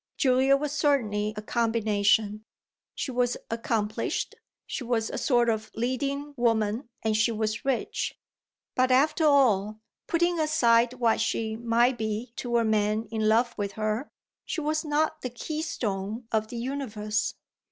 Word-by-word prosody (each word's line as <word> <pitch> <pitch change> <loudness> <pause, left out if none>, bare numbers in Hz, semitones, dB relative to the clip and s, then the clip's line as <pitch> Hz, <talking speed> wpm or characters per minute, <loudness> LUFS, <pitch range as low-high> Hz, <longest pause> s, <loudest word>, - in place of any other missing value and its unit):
Julia 265 0 +4
was 295 0 -3
certainly 230 -9 +1
a 210 - -5
combination 215 -2 +1 0.5
she 270 - -3
was 245 -1 +1
accomplished, 225 -2 -1 0.3
she 265 - -4
was 230 -2 -1
a - - -4
sort 240 -4 +3
of 220 -1 -1
leading 275 +5 -2
woman 225 0 +1
and 220 -1 +1
she 220 +2 +3
was 220 0 -2
rich; 270 -3 -1 0.6
but 255 0 +2
after 305 +5 +3
all 215 -8 +3 0.3
putting 345 0 +1
aside 245 -6 +3
what 235 -3 +1
she 220 0 -1
might 235 +2 +2
be 220 +2 -3
to 240 -1 0
a 230 - +2
man 215 0 +1
in 220 -1 +1
love 235 +2 +3
with 200 -1 -2
her 215 +5 -2 0.3
she - - -3
was 310 +1 -1
not 310 +1 0
the 255 - -3
keystone 235 - -4
of 220 -1 +1
the 235 - -7
universe. 225 -5 -2
235 Hz, 145 wpm, -27 LUFS, 215-270 Hz, 0.6 s, Julia